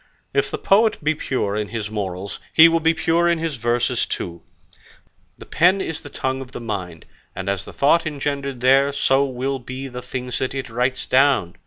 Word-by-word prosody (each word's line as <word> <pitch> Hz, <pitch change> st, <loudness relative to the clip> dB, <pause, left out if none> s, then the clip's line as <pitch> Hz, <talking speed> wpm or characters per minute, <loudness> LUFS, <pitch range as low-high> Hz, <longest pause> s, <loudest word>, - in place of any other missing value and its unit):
If -, -, +1 dB
the -, -, -3 dB
poet 215 Hz, +3 st, +3 dB
be 155 Hz, +1 st, +2 dB
pure 130 Hz, -9 st, -2 dB
in 105 Hz, -1 st, -2 dB
his 105 Hz, 0 st, -5 dB
morals, 100 Hz, -2 st, -4 dB
he 160 Hz, +1 st, +8 dB
will 165 Hz, 0 st, +2 dB
be 165 Hz, +1 st, +2 dB
pure 170 Hz, +1 st, +2 dB
in 170 Hz, -, +2 dB
his 160 Hz, -4 st, -3 dB
verses 120 Hz, +1 st, 0 dB
too; 85 Hz, -1 st, -5 dB, 1.0 s
the -, -, -11 dB
pen 180 Hz, +4 st, +3 dB
is 165 Hz, -4 st, -4 dB
the 145 Hz, -, -10 dB
tongue 130 Hz, -1 st, -3 dB
of 130 Hz, -1 st, -10 dB
the -, -, -5 dB
mind, 95 Hz, -8 st, -5 dB, 0.3 s
and 95 Hz, 0 st, -5 dB
as 100 Hz, -1 st, -1 dB
the -, -, -9 dB
thought 160 Hz, +4 st, +3 dB
engendered 140 Hz, -3 st, -3 dB
there, 135 Hz, +2 st, +4 dB
so 135 Hz, 0 st, +3 dB
will 135 Hz, +1 st, -3 dB
be 130 Hz, +2 st, -7 dB
the 125 Hz, -1 st, -7 dB
things 125 Hz, 0 st, -4 dB
that 130 Hz, +1 st, -2 dB
it 130 Hz, -3 st, -5 dB
writes 125 Hz, +2 st, -1 dB
down. 130 Hz, -10 st, +3 dB
130 Hz, 200 wpm, -21 LUFS, 115-145 Hz, 1.0 s, he